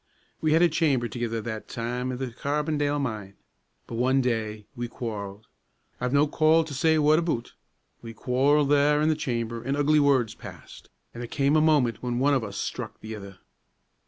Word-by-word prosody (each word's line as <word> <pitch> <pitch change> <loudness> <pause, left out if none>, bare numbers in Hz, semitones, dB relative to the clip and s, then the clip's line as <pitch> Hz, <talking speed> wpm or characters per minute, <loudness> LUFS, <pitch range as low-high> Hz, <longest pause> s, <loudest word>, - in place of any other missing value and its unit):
We 155 -1 +2
had 165 +2 +5
a - - +7
chamber 150 -7 +1
thegither 115 -2 -3
that 110 -2 -5
time 125 +2 -3
i' - - -3
the 130 -1 -4
Carbondale 145 +3 -1
mine. 105 -7 -4 0.5
But 115 - -6
one 130 +2 +3
day 110 -4 -2
we 120 -1 -4
quarrelled, 105 -4 -6 0.5
I've 125 0 -1
no 140 +2 +4
call 160 +2 +3
to 155 -2 -8
say 160 +3 +2
what 155 +1 +4
aboot, 165 -9 -2 0.5
we 115 - -8
quarrelled 135 +5 +2
there 145 +1 +4
in 155 +1 +2
the 155 - +2
chamber, 115 -5 -3
an' 135 +3 -1
ugly 150 +1 +3
words 135 -6 +3
passed, - - -12 0.2
an' 120 - -9
there 120 - -5
cam' 140 +3 +1
a 155 - +5
moment 145 -8 +2
when 120 -1 -2
one 140 +3 +3
o' 135 - +3
us 100 0 -8
struck - - -5
the 110 +1 -7
ither. 100 -3 -9
130 Hz, 190 wpm, -26 LUFS, 115-150 Hz, 0.5 s, a